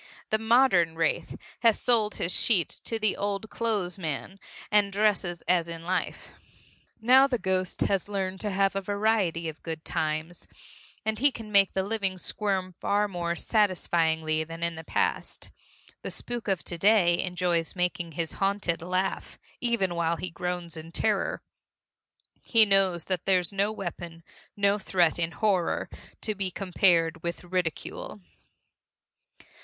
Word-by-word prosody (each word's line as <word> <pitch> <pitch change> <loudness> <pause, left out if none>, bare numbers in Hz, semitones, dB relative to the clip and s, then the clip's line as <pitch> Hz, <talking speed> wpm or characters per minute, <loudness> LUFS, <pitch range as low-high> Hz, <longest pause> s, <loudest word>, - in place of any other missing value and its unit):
The 215 - +2
modern 220 -8 +4
wraith 165 -1 -1 0.2
has 230 -2 +4
sold 225 -4 +2
his 170 - 0
sheet 195 -8 +3 0.2
to 225 - -1
the 215 -2 +1
old 200 +1 -3
clo'es 205 -6 -2
man, 165 +4 -4 0.3
and 205 -1 +4
dresses 195 -4 +1
as 170 -2 +1
in 165 0 -7
life. 180 +1 -2 0.7
Now 260 +4 +6
the 255 -3 0
ghost 185 -3 -1
has 195 0 +1
learned 190 -2 -2
to 210 - -2
have 195 0 +1
a 195 - 0
variety 200 -5 0
of 160 -1 -7
good 160 -1 -6
times, 155 +2 -3 0.6
and 220 -1 -1
he 285 +3 +5
can 225 -3 -9
make 200 -1 +5
the 190 - 0
living 195 -2 -1
squirm 190 -1 -2
far 205 +3 0
more 170 -3 -3
satisfyingly 165 -6 +1
than 165 +1 -7
in 170 0 0
the 160 0 -8
past. - - -2 0.5
The - - -5
spook 240 -2 -5
of 190 -7 0
to 170 +2 -5
day 190 -4 +4
enjoys 180 -2 -1
making 175 -2 -2
his 165 +1 -3
haunted 195 -4 0
laugh 185 +2 -2 0.2
even 235 -7 +1
while 170 0 0
he 180 +1 -5
groans 175 -1 -4
in 160 +1 -9
terror. - - 0 1.0
He 225 -2 +5
knows 195 -4 +3
that 185 -3 -2
there's 180 -1 +2
no 200 +2 +1
weapon, 175 -4 -7 0.3
no 200 +1 +2
threat, 175 -4 +2
in 165 -1 +1
horror, 180 +2 0 0.3
to 215 - -1
be 195 -2 -1
compared 175 -3 +2
with 170 +1 -4
ridicule. 180 +3 -4
185 Hz, 150 wpm, -27 LUFS, 170-205 Hz, 1.0 s, Now